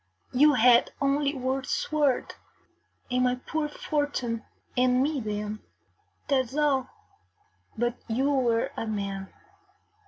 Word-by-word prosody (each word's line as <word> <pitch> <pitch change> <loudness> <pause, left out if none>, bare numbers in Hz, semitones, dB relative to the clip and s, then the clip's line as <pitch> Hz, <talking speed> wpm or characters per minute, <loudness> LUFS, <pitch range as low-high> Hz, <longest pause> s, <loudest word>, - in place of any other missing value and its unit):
You 290 +4 +6
had 240 0 +5
only 280 0 +1
your 260 +1 -1
sword 290 -1 0 0.8
and 250 0 +2
my 250 0 +2
poor 300 +4 -3
fortune 285 -7 -2 0.3
and 250 0 +3
me 295 0 0
then 210 -1 -4 0.7
that 275 -2 +3
is 265 +5 -8
all; 280 -4 +2 0.9
but 240 +1 0
you 260 +5 +1
were 240 -4 +1
a 225 - -4
man. 200 -2 -4
255 Hz, 120 wpm, -27 LUFS, 230-285 Hz, 0.9 s, You